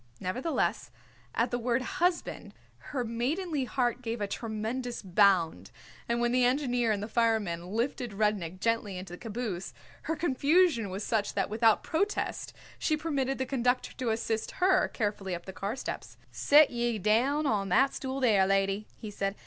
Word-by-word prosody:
Nevertheless, 255 - -1 0.5
at 235 +1 +1
the 245 - -1
word 240 +1 0 0.2
"husband" 355 -1 -1 0.3
her 265 -4 -1
maidenly 275 +6 -1
heart 245 -1 0
gave 230 -1 -3
a 205 - 0
tremendous 230 +4 -4
bound, 180 - +3 0.4
and 235 0 +1
when 240 0 +1
the 250 0 +3
engineer 245 -3 +2
and 205 -1 -1
the - - -4
fireman 220 -7 0
lifted 235 +2 -2
Rudnik 195 -4 0
gently 225 -3 0
into 180 -1 -8
the 175 - -8
caboose 220 -5 -4 0.3
her 320 - +1
confusion 300 - +2
was 190 +3 -4
such 210 -2 -1
that 195 0 0
without 220 0 +3
protest 400 +6 -1 0.3
she 310 - +1
permitted 275 -4 -1
the 260 - -1
conductor 250 -1 0
to 255 -3 -1
assist 225 0 -2
her 375 +1 +4
carefully 205 -4 -2
up 170 - -9
the 190 - -7
car 200 +4 -3
steps. 265 - -6
"Sit 295 +1 +5
ye 240 -2 0
down 245 +9 +2
on 205 -6 0
that 270 +10 +4
stool 265 0 -4
there, 210 -7 +4
lady," 195 +1 +1
he 215 - -7
said. 195 0 -2
230 Hz, 165 wpm, -29 LUFS, 200-260 Hz, 0.5 s, Sit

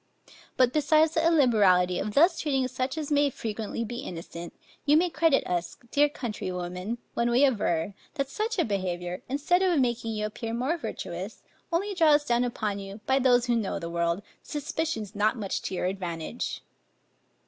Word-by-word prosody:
But 255 -1 +4
besides 310 +1 +4
the 320 - +1
illiberality 210 - +4
of 210 0 -3
thus 335 +3 +5
treating 270 -4 +1
such 260 +3 -3
as 305 -1 -4
may 290 0 +4
frequently 225 -2 -4
be 240 +2 -5
innocent, 170 -7 -7 0.3
you 295 +1 +5
may 350 +1 +2
credit 325 -5 +3
us, 175 -1 -2
dear 290 +1 +4
countrywomen, 185 -4 -4 0.2
when 235 0 +1
we 250 +4 +5
aver, 200 -8 0 0.2
that 275 -3 -1
such 430 - -2
a 345 - +3
behavior, 180 -3 -3
instead 295 +7 +2
of 360 -5 +3
making 235 -3 0
you 210 0 -1
appear 225 +2 -4
more 260 +8 0
virtuous, 340 - -6 0.3
only 395 +5 0
draws 305 -5 +4
down 240 -2 +2
upon 215 -4 -2
you, 195 +1 -8
by 265 +1 +3
those 245 -2 +4
who 240 -1 +2
know 220 -4 -1
the 170 0 -5
world, 170 +3 0 0.2
suspicions 295 - -3
not 215 +3 +1
much 200 -3 -2
to 190 - -4
your 180 - -1
advantage. 180 +2 -4
240 Hz, 170 wpm, -27 LUFS, 195-290 Hz, 0.3 s, thus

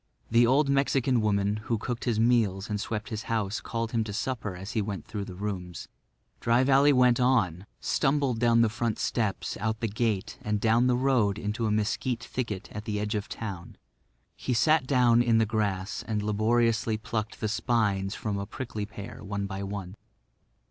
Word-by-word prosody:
The 115 +1 +5
old 140 +4 +4
Mexican 135 -3 +2
woman 100 -1 +1
who 115 - 0
cooked 120 +3 -4
his 115 -3 +1
meals 110 -4 +2
and 105 -1 -1
swept 110 0 -4
his 110 -2 -5
house 110 -2 -1
called 115 -1 -3
him 115 -2 +1
to 105 - -5
supper 110 -3 -3
as 95 +4 -7
he 110 - 0
went 100 -5 -4
through 105 -3 -5
the 90 - -9
rooms. 90 -3 -5 0.5
Dry 120 +2 +3
Valley 140 +2 +5
went 125 -2 +4
on, 105 -8 +2
stumbled 135 -4 +1
down 115 -1 +4
the 115 - +5
front 110 0 -2
steps, 110 -5 -1
out 110 +1 -2
the 115 - -1
gate 110 -2 -2
and 105 0 -1
down 115 +3 +3
the 125 - +3
road 125 -6 +2
into 110 +1 -2
a - - 0
mesquite 115 +3 -1
thicket 110 -7 -4
at 105 +1 -7
the 105 -1 -2
edge 105 0 -2
of 105 -1 -3
town. 95 -6 -6 0.6
He 125 - -2
sat 150 +2 +3
down 125 -3 +4
in 120 -2 +3
the 110 - +4
grass 105 -3 -2
and 105 -2 -1
laboriously 110 +1 +1
plucked 110 0 -4
the 110 - -1
spines 105 -3 0
from 105 -2 -3
a 100 - -4
prickly 110 -5 -5
pear, 105 0 -9
one 100 0 -3
by 95 0 -5
one. 100 -2 -5
110 Hz, 190 wpm, -28 LUFS, 105-120 Hz, 0.6 s, The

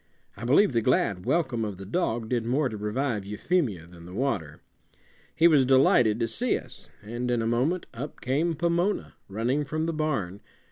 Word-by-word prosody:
I 115 - -7
believe 145 - +4
the 115 - +2
glad 105 -6 +1
welcome 130 -9 +1
of 105 -3 -4
the 95 - -9
dog 115 - -1
did 120 -2 0
more 130 +4 +1
to 110 - -6
revive 105 +1 -2
Euphemia 105 - -1
than 85 0 -14
the 90 - -10
water. 100 - -2 0.8
He 165 +1 +6
was 150 -5 +5
delighted 125 -4 +4
to 115 - +2
see 240 - +1
us, 125 - -8
and 120 +4 -4
in 120 -1 +1
a - - -1
moment 130 +10 0
up 135 +6 -7
came 155 +6 0
Pomona, 170 +5 0
running 120 +8 -1
from 155 +2 -2
the 165 - -1
barn. 135 - -2
125 Hz, 185 wpm, -27 LUFS, 105-150 Hz, 0.8 s, He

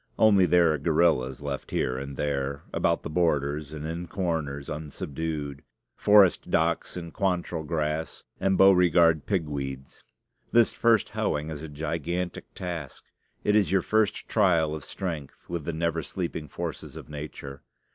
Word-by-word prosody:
Only 100 -4 +5
there 85 -3 +5
are 75 - -2
guerrillas 75 -4 +2
left 70 -1 -4
here 65 - 0
and 70 +1 -6
there, 70 -1 -2
about 85 0 +1
the - - -5
borders 75 -3 0
and 75 -1 -6
in 85 +2 -4
corners, 80 -7 -2
unsubdued 75 -1 -4 0.3
Forest 100 -3 +5
docks, 85 +2 0
and 85 -2 -7
Quantrell 90 -3 -1
grass, 80 0 -2 0.2
and 95 -1 +2
Beauregard 85 -5 +5
pigweeds. 70 -7 -3 0.5
This 120 -1 +4
first 115 -3 +3
hoeing 75 +2 -1
is 75 -1 -6
a 80 - -7
gigantic 85 +4 -3
task: 85 -6 -6 0.4
it 105 - +2
is 100 -6 +3
your 95 -2 +3
first 110 -1 +1
trial 85 -7 +3
of 80 -2 -5
strength 80 -8 -6
with 85 -4 -4
the 85 - -1
never 85 0 -1
sleeping 80 -1 -4
forces - - -6
of - - -9
Nature. 75 -2 -8
80 Hz, 145 wpm, -27 LUFS, 75-90 Hz, 0.5 s, Only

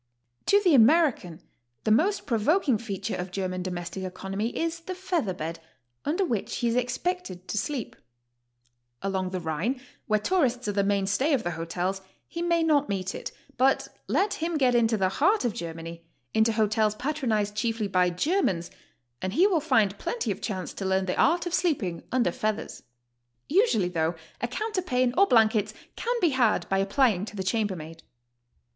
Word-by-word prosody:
To 405 - +6
the 365 -5 +3
American 255 - +4 0.4
the 215 - +1
most 370 - +2
provoking 255 - +2
feature 200 -5 -4
of 180 +1 -4
German 185 0 -3
domestic 180 0 -5
economy 195 +3 -3
is 330 0 -1
the 365 +3 -6
feather 355 - -1
bed, 165 0 -5 0.5
under 345 +7 +1
which 230 - -2
he 240 - 0
is 230 - 0
expected 250 - -2
to - - -3
sleep. 240 +4 -3 1.1
Along 190 -1 -1
the 185 0 -3
Rhine, 170 - -2 0.3
where 215 -1 +2
tourists 250 - +1
are - - +1
the 200 0 +1
mainstay 200 +9 +1
of 255 -5 +1
the 175 - -2
hotels, 175 +4 -3 0.3
he 335 - -5
may 340 -1 +2
not 295 -4 +2
meet 190 -1 -2
it, - - -6 0.3
but 265 +2 +2 0.2
let 400 +1 +1
him 330 0 -2
get 255 -4 +3
into 230 -2 +3
the 190 -2 +2
heart 360 - +2
of 235 - 0
Germany, 165 0 -7 0.3
into 220 +1 +3
hotels 215 0 +2
patronized 235 -6 -1
chiefly 225 0 -1
by 185 -2 +3
Germans, 185 - 0 0.5
and 185 0 -2
he 350 - +5
will 380 -5 +3
find 210 -9 +2
plenty 470 -1 -2
of - - -5
chance 190 -4 -4
to - - -6
learn 190 0 +1
the 180 - -1
art 340 +3 +3
of 350 - -4
sleeping 245 - 0
under 245 -8 +2
feathers. 215 +4 -3 0.7
Usually, 330 - +3
though, 165 -1 0 0.3
a 240 - 0
counterpane 255 - 0
or 395 +2 +5
blankets 220 - +3 0.2
can 485 +1 -1
be 345 - +4
had 255 -6 +2
by 195 0 +2
ai)plying 200 -2 +2
to 215 - -9
the 190 - -3
chambermaid. 185 -6 -2
220 Hz, 170 wpm, -27 LUFS, 190-305 Hz, 1.1 s, To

